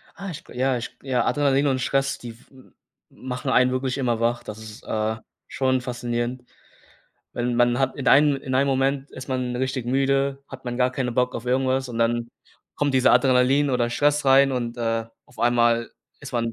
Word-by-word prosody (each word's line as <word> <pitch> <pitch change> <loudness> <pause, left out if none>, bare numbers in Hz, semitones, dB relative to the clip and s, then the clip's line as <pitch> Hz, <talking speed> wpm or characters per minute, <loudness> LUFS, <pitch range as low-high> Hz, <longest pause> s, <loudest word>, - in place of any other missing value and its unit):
Ah, 195 0 -7
ich 165 - -8
g - - -15
ja, 130 0 +1
ich 120 - -8
g 135 - -16
ja, 125 -2 +1
Adrenalin 140 -1 +2
und 130 -2 +1
Stress, 135 +1 0
die 115 -2 -9
w - - -22
m 130 -1 -19 0.4
machen 125 +1 -6
einen 125 0 +4
wirklich 130 +1 -2
immer 120 -4 0
wach. 120 +1 0
Das 105 +1 -8
ist, 110 0 -11
äh, 110 0 -2 0.3
schon 130 -1 0
faszinierend, 120 0 -3 0.9
wenn 120 0 -2
man 120 0 +3
hat 135 -1 0
in 135 - -1
einem 145 0 +5
in 135 -1 -5
einem 140 +2 +3
Moment 135 +1 0
ist 130 +1 -10
man 130 -2 -2
richtig 130 -1 -2
müde, 135 +1 +1
hat 130 -1 -11
man 120 -1 -4
gar 125 0 +3
keine 130 -1 -2
Bock 125 +1 0
auf 115 - -5
irgendwas 130 +1 +1
und 115 -2 -5
dann 115 0 0 0.5
kommt 145 -2 0
dieser 130 -1 +4
Adrenalin 130 +3 +4
oder 120 -2 +1
Stress 145 +4 +1
rein 135 0 +5
und, 120 -1 -3
äh, 115 -1 -1 0.2
auf 125 - -22
einmal 120 -1 +2 0.3
ist - - -9
man 115 -1 -1
130 Hz, 205 wpm, -23 LUFS, 120-135 Hz, 0.9 s, einem